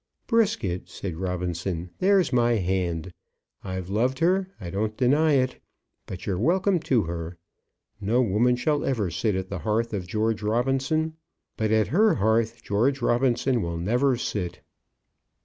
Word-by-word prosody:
"Brisket," 210 - 0
said 90 -5 -6
Robinson, 90 -1 -3
"there's 190 -5 +3
my 120 -1 +3
hand. 90 -3 -1 0.5
I've 95 -2 -5
loved 120 +7 0
her. 185 +3 +2
I 90 -5 -6
don't 110 +3 -2
deny 145 +5 +3
it. 130 -2 +1 0.5
But 90 - -7
you're 95 -3 -1
welcome 185 - +2
to 130 -7 +1
her. 85 +1 -5 0.6
No 110 +4 +1
woman 120 +2 +3
shall 145 +3 0
ever 110 -10 -1
sit 105 -4 0
at 95 0 -3
the 95 - -4
hearth 110 +6 -1
of 95 -4 -3
George 110 +3 0
Robinson; 135 +8 0 0.4
but 110 -1 -1
at 110 0 +2
her 210 +3 +4
hearth 115 +2 +1
George 125 +6 +1
Robinson 120 0 +2
will 85 -2 -3
never 120 +9 +1
sit." 90 -7 -4
110 Hz, 150 wpm, -25 LUFS, 95-135 Hz, 0.6 s, her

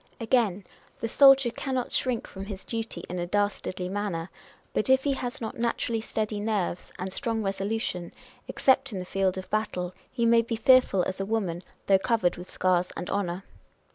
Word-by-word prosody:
Again, 225 -5 +1 0.4
the 230 - -2
soldier 270 0 +6
cannot 260 0 -3
shrink 255 -4 0
from 195 0 -8
his 200 -2 -7
duty 225 -1 -4
in 180 - -4
a 175 - -2
dastardly 195 -2 -1
manner; 190 -3 -3 0.4
but 215 - 0
if 265 0 +5
he 285 - +2
has 245 -2 -4
not 225 0 -5
naturally 230 -1 0
steady 215 -1 -2
nerves 205 -4 -2
and 185 +1 -4
strong 225 -3 -1
resolution 195 -2 -2
â€" - - -25 0.3
except 265 0 +2
in 200 - -4
the 180 - -4
field 190 0 0
of 185 - -6
battle, 185 -4 -1 0.2
he 235 -3 0
may 230 0 +6
be 230 0 -3
fearful 230 -5 +5
as 190 +1 -3
a 195 - -1
woman, 195 -6 -1 0.2
though 195 -1 +5
covered 200 -5 +1
with 180 +1 -10
scars 180 -1 +1
and 180 - -4
honour. 190 -2 -1
210 Hz, 185 wpm, -27 LUFS, 185-230 Hz, 0.4 s, soldier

